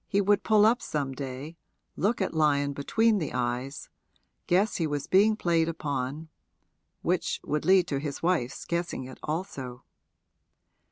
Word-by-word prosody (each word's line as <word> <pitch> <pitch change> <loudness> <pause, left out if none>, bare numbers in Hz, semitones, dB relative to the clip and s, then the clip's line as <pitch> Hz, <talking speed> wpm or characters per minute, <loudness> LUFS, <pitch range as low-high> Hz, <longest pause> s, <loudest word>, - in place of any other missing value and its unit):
He 200 - +1
would 205 0 +3
pull 215 -1 +4
up 230 +3 +3
some 140 -3 -2
day, 135 +4 -6 0.4
look 210 +3 0
at - - -3
Lyon 145 -3 +2
between 215 +10 +2
the 155 - -3
eyes 125 +3 -3 0.6
guess 195 +5 +2
he 165 - 0
was 145 -2 -2
being 210 +3 +4
played 165 -5 +1
upon 145 -1 -3 0.7
which - - 0
would 150 +1 -2
lead 185 0 +5
to 140 - -1
his 145 +1 -5
wife's 165 -8 0
guessing 170 -5 -2
it 130 0 -10
also. 140 -6 -5
155 Hz, 150 wpm, -28 LUFS, 140-190 Hz, 0.7 s, lead